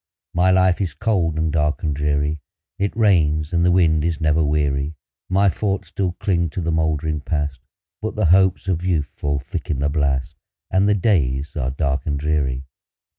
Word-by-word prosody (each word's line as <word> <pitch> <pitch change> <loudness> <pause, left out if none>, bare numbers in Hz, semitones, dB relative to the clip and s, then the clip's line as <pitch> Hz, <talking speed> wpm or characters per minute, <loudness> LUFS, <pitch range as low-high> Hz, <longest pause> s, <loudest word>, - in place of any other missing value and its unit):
My 90 +2 +3
life 95 0 +3
is 85 -7 -2
cold, 90 -8 0
and 80 0 0
dark, 75 -1 0
and 75 -3 0
dreary; 75 +1 0 0.4
It 100 +2 -1
rains, 80 -7 +2
and 85 0 +2
the 90 - +4
wind 80 -4 +3
is 80 -2 -1
never 80 0 +2
weary; 75 0 0 0.3
My 100 +2 +3
thoughts 100 -1 -1
still 95 -1 -2
cling 85 -3 0
to 90 - -4
the 85 0 -1
moldering 80 -1 0
Past, 75 -3 -2 0.4
But - - -3
the - - +1
hopes 95 0 +3
of 90 -2 -1
youth 80 -6 0
fall 70 -1 -1
thick 65 -2 -6
in 70 - 0
the 70 +2 0
blast, 70 -1 -1 0.3
And 95 +2 +3
the 105 - +4
days 75 - 0
are 65 -5 -1
dark 70 +2 -2
and 70 -2 0
dreary. 70 -3 -1
80 Hz, 185 wpm, -21 LUFS, 75-90 Hz, 0.4 s, the